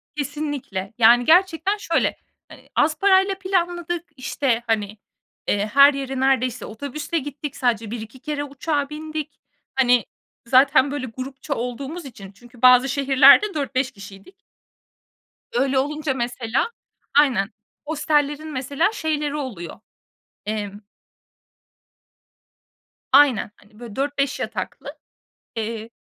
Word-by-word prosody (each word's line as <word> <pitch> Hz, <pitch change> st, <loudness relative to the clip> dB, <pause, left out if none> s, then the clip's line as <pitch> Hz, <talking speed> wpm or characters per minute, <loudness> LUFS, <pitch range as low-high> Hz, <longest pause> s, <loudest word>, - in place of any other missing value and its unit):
Kesinlikle, 285 Hz, -9 st, -4 dB
yani, 240 Hz, +1 st, +6 dB
gerçekten 365 Hz, +3 st, +3 dB
şöyle; 335 Hz, -5 st, 0 dB, 0.3 s
hani, -, -, -16 dB
az 305 Hz, +1 st, +2 dB
parayla 390 Hz, 0 st, +4 dB
planladık, 350 Hz, -2 st, -1 dB
işte, 255 Hz, -2 st, -1 dB
hani, 210 Hz, -1 st, -1 dB, 0.5 s
eee, 205 Hz, 0 st, +1 dB
her 280 Hz, +1 st, +8 dB
yere 270 Hz, -1 st, -4 dB
neredeyse 255 Hz, -2 st, +1 dB
otobüsle 285 Hz, +8 st, -4 dB
gittik, 290 Hz, 0 st, -7 dB
sadece 230 Hz, -4 st, -1 dB
1-2 230 Hz, +2 st, -7 dB
kere 295 Hz, 0 st, -3 dB
uçağa 285 Hz, +1 st, -2 dB
bindik. 310 Hz, -1 st, -6 dB, 0.4 s
Hani, 245 Hz, -4 st, +3 dB, 0.4 s
zaten 265 Hz, +1 st, +5 dB
böyle 285 Hz, -3 st, -3 dB
grupça 265 Hz, +4 st, -6 dB
olduğumuz 275 Hz, +7 st, -5 dB
için. 200 Hz, -7 st, -11 dB
Çünkü 240 Hz, +4 st, -18 dB
bazı 255 Hz, +1 st, +6 dB
şehirlerde 280 Hz, +9 st, +5 dB
4-5 275 Hz, -3 st, -1 dB
kişiydik. 200 Hz, -, -13 dB, 1.2 s
Öyle 265 Hz, +2 st, +2 dB
olunca 295 Hz, 0 st, -1 dB
mesela 240 Hz, -, -1 dB, 0.5 s
Aynen, 240 Hz, -9 st, +2 dB, 0.4 s
hostellerin 295 Hz, 0 st, 0 dB
mesela 280 Hz, -, 0 dB
şeyleri 300 Hz, -4 st, -2 dB
oluyor; 210 Hz, -, -6 dB, 0.7 s
emm 205 Hz, -1 st, -4 dB, 2.3 s
Aynen, 270 Hz, -6 st, +5 dB
hani, 210 Hz, +2 st, -22 dB
böyle 235 Hz, -4 st, -9 dB
4-5 280 Hz, 0 st, -1 dB
yataklı, -, -, -5 dB, 0.6 s
eee, 225 Hz, 0 st, -4 dB
270 Hz, 110 wpm, -22 LUFS, 240-300 Hz, 2.3 s, her